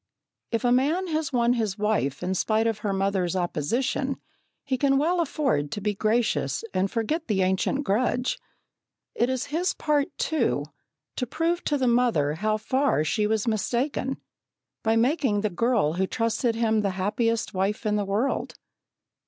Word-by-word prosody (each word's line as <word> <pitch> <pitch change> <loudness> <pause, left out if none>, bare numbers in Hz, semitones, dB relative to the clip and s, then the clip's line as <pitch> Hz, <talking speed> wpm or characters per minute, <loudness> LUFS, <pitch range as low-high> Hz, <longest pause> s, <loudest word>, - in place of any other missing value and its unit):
If 230 +1 -1
a 245 - +3
man 295 +9 +2
has 310 -2 -1
won 240 -2 +3
his 220 -5 -1
wife 205 -10 0
in 185 +1 0
spite 215 +4 +1
of 225 -2 0
her 210 -1 -2
mother's 195 -2 0
opposition, 235 - -1 0.4
he 270 - -1
can 275 +1 +2
well 340 +5 +2
afford 270 - 0
to - - -3
be 210 +1 -1
gracious 220 - 0
and 190 +1 +1
forget 275 - -2
the 195 -4 +2
ancient 190 +10 0
grudge. 250 +3 0 0.7
It 240 - +1
is 260 -1 -1
his 355 +3 0
part, 295 -2 +1
too, 235 - 0 0.5
to 250 - -1
prove 330 +6 -1
to 295 - +1
the 260 - 0
mother 235 -12 +2
how 215 +6 0
far 260 - +1
she 210 +7 +1
was 220 +1 0
mistaken, 250 +5 -1 0.6
by 225 0 +2
making 245 -3 +2
the 215 -1 -1
girl 215 -5 +1
who 190 +2 0
trusted 230 +2 0
him 220 -2 +2
the 200 - 0
happiest 225 +4 0
wife 195 +4 -1
in 210 0 +1
the 205 - +1
world. 210 +7 -1
230 Hz, 165 wpm, -26 LUFS, 200-265 Hz, 0.7 s, a